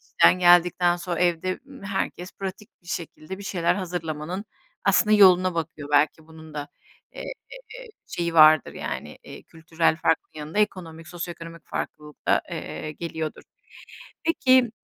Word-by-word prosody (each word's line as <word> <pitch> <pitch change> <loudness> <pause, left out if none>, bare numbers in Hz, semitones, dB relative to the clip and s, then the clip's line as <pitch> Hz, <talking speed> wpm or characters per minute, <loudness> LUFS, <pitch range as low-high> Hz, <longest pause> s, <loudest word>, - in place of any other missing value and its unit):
işten - - +4
geldikten 175 0 +5
sonra 175 0 -4
evde, 180 +1 +1
ımm, 270 -7 -13
herkes 190 -2 -3
pratik 195 +2 -7
bir 175 - -17
şekilde 175 +1 -6
bir 200 - -9
şeyler 175 -4 +1
hazırlamanın 175 0 -4 0.4
aslında 215 -1 +4
yoluna 185 -2 +6
bakıyor 155 -3 -4
belki 155 +2 +2
bunun 160 -1 -13
da, 145 0 -5 0.4
eee, - - -8 0.8
şeyi 170 -1 -3
vardır 155 0 +7
yani, - - -6
iii, - - -11
kültürel 165 0 0
farkın 165 - 0
yanında 155 +6 -5
ekonomik, 165 -6 -2
sosyoekonomik 170 -1 -8
farklılık 150 -1 -7
da, - - +4
eee, 155 - -5
geliyordur. 160 -1 -5 0.8
Peki, 260 -7 +4
170 Hz, 135 wpm, -25 LUFS, 160-185 Hz, 0.8 s, vardır